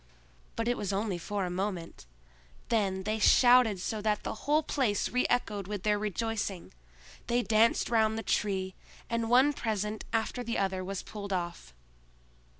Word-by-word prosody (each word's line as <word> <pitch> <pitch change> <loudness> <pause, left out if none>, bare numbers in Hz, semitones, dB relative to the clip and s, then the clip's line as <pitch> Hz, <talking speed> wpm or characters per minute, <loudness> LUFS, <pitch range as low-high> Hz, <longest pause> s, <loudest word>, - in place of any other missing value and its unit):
But 230 - -2
it 245 - +1
was 205 -2 -2
only 195 -2 -1
for 200 +2 -2
a 180 - -4
moment; 180 - -4 0.6
then 195 -4 0
they 215 +2 -1
shouted 245 -3 +5
so 215 +3 -3
that 210 -1 0
the - - -3 0.2
whole 305 +1 +4
place 240 -10 0
reechoed 240 -5 0
with 205 -2 -5
their 210 -1 +2
rejoicing; 210 - -3 0.5
they 240 +1 +1
danced 225 +1 +3
round 220 -1 +3
the 225 - -4
Tree, 190 -2 -1 0.4
and 230 -1 -1
one 260 +4 +5
present 215 -3 -3
after 225 +2 -1
the 235 0 -2
other 190 -1 -1
was 195 0 -5
pulled 200 -2 -7
off. 170 - -4
210 Hz, 155 wpm, -30 LUFS, 195-230 Hz, 0.6 s, shouted